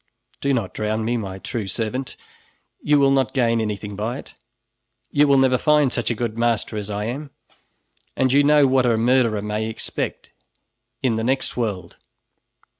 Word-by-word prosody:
"Do 140 - 0
not 115 -8 -1
drown 110 +1 -2
me, 120 +2 0
my 95 -5 -4
true 105 +1 -5
servant, 120 +6 -3 0.6
you 150 0 +3
will 140 -1 +4
not 135 -2 +1
gain 115 -3 +2
anything 105 -1 -4
by 110 +5 -3
it. - - -11 0.8
You 145 +1 +4
will 140 -1 +5
never 130 -1 +3
find 150 -3 +3
such 120 - -1
a 120 - 0
good 115 0 -3
master 115 -2 0
as 105 -1 -4
I 105 0 -3
am, 140 +6 -5 0.9
and 130 -1 +2
you 145 +1 +5
know 145 0 +5
what 130 -1 +3
a 115 -2 +2
murderer 115 -3 +2
may 105 +1 -2
expect 110 - -4 0.7
in 120 -4 +1
the 110 - -2
next 130 +3 0
world." 105 -6 -3
120 Hz, 175 wpm, -22 LUFS, 110-135 Hz, 0.9 s, will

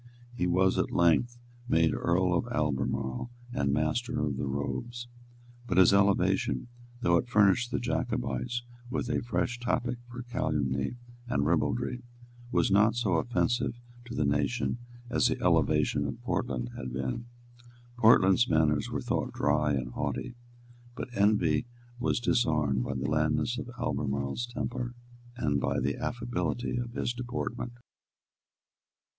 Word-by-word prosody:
He 90 -7 0
was 95 +1 +3
at - - +1
length 85 +9 +3 0.3
made 80 -7 +3
Earl 90 +1 +1
of 90 +7 0
Albemarle 70 - -1 0.2
and 70 -1 +1
Master 100 - 0
of 75 -2 0
the 70 - -3
Robes. 120 - -3 0.6
But 90 - -1
his 95 +1 +7
elevation, 100 - +2 0.3
though 85 -7 +4
it 85 - -1
furnished 110 +2 +4
the - - -1
Jacobites 120 0 -2 0.3
with 125 -1 -2
a - - 0
fresh 120 0 -1
topic 120 0 -1
for 120 0 -7
calumny 75 - -1 0.3
and 70 -11 +1
ribaldry, 120 +10 0 0.5
was 120 - +2
not 105 +3 +5
so 105 -8 +1
offensive 120 +4 0 0.3
to 120 - -7
the 75 - +1
nation 75 - 0 0.3
as 120 - +2
the - - -1
elevation 70 0 +2
of 70 - -5
Portland 60 -2 -2
had 65 -1 -5
been. 65 - -3 0.7
Portland's 110 0 +6
manners 75 -2 +2
were - - -2
thought - - -1
dry 75 -1 +2
and 65 -2 -2
haughty; 125 - -3 0.6
but 125 - -5
envy 100 -2 +3 0.3
was 120 - +1
disarmed 75 - +2
by - - -3
the 65 - -2
blandness 75 +8 +1
of 125 - -6
Albemarle's 70 - -1
temper 120 +1 -4 0.4
and 70 - +1
by - - 0
the - - 0
affability 120 -2 -2
of 120 -1 -4
his 120 - -1
deportment. 120 0 -4
95 Hz, 140 wpm, -29 LUFS, 75-120 Hz, 0.7 s, his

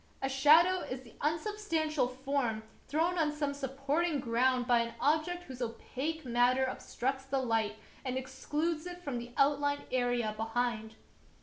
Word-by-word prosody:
A 270 - -1
shadow 315 +7 +6
is 255 -6 -5
the 235 - -15
unsubstantial 320 - 0
form 255 -3 -1 0.2
thrown 335 +4 +1
on 305 -2 +2
some 295 -1 -2
supporting 280 +4 -1
ground 250 +1 +2
by 240 -1 +4
an 235 0 -2
object 320 +4 +1
whose 260 -6 -9
opaque 265 +6 -4
matter 250 +2 +3
ob 255 - -4
structs 265 +2 -3
the 275 - +1
light 225 -4 0 0.3
and 255 -1 -2
excludes 300 +5 -2
it 355 0 -8
from 270 -6 -2
the 240 +1 -8
outlined 285 0 +2
area 245 -3 +1
behind. 225 0 -2
270 Hz, 150 wpm, -32 LUFS, 245-310 Hz, 0.3 s, shadow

